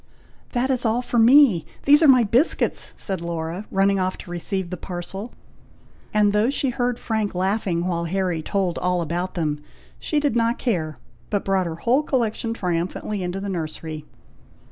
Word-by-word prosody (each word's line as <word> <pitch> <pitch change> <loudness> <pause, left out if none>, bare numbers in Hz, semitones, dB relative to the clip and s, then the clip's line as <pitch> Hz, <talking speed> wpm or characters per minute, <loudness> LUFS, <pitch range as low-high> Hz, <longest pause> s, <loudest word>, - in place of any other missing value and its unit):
"That 255 +1 +1
is 255 -2 +1
all 235 +1 +1
for 240 -1 0
me! 235 - +6 0.2
these 290 +2 +6
are 315 - +6
my 255 -3 +7
biscuits!" 240 +8 +1
said 190 -4 -3
Laura, 170 +3 -4
running 195 0 +2
off 185 0 -1
to 175 - -10
receive 180 +1 -3
the - - -2
parcel, 190 +5 -6 0.8
and 210 -1 +3
though 210 +3 +3
she 275 -1 0
heard 245 0 -1
Frank 220 -5 -2
laughing, 185 -2 0
while 170 -2 -1
Harry 180 -2 -1
told 185 0 -1
all 180 -1 0
about 175 +3 -3
them, 150 -4 -1 0.4
she 305 - 0
did 290 -5 0
not 230 0 +2
care, 165 - -2 0.3
but 205 - -1
brought 190 -2 +1
her 165 - -4
whole 240 - +2
collection 235 -5 -1
triumphantly 185 +1 -2
into 180 +1 -3
the 200 - -5
nursery. 160 -3 -5
195 Hz, 170 wpm, -23 LUFS, 175-235 Hz, 0.8 s, my